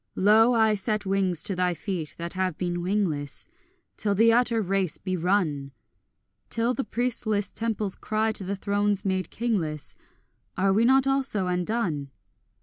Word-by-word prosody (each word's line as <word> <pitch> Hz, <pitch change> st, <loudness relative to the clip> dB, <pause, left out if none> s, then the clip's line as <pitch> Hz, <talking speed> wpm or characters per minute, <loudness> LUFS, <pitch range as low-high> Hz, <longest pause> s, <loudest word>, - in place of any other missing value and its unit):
Lo, 220 Hz, +5 st, +5 dB
I 220 Hz, -1 st, +4 dB
set 210 Hz, +1 st, -2 dB
wings 190 Hz, -4 st, +1 dB
to 195 Hz, -, -2 dB
thy 180 Hz, -1 st, +1 dB
feet 175 Hz, -5 st, -4 dB
that 170 Hz, 0 st, -5 dB
have 185 Hz, -3 st, -1 dB
been 175 Hz, -1 st, -2 dB
wingless, 175 Hz, -7 st, -1 dB, 0.5 s
Till 205 Hz, -2 st, 0 dB
the 225 Hz, +3 st, +5 dB
utter 235 Hz, -1 st, +3 dB
race 195 Hz, -4 st, 0 dB
be 185 Hz, -1 st, -3 dB
run; 160 Hz, -7 st, 0 dB, 0.8 s
Till 230 Hz, +2 st, +1 dB
the 270 Hz, -, -2 dB
priestless 220 Hz, -5 st, -1 dB
temples 220 Hz, -4 st, -2 dB
cry 220 Hz, +1 st, 0 dB
to 210 Hz, -, -3 dB
the 195 Hz, +2 st, -2 dB
thrones 205 Hz, 0 st, 0 dB
made 190 Hz, -3 st, -1 dB
kingless, 175 Hz, -11 st, -2 dB, 0.6 s
Are 195 Hz, +1 st, +3 dB
we 220 Hz, +4 st, +3 dB
not 265 Hz, +2 st, +5 dB
also 270 Hz, -8 st, 0 dB
undone? 180 Hz, -5 st, -1 dB
200 Hz, 150 wpm, -26 LUFS, 180-220 Hz, 0.8 s, Lo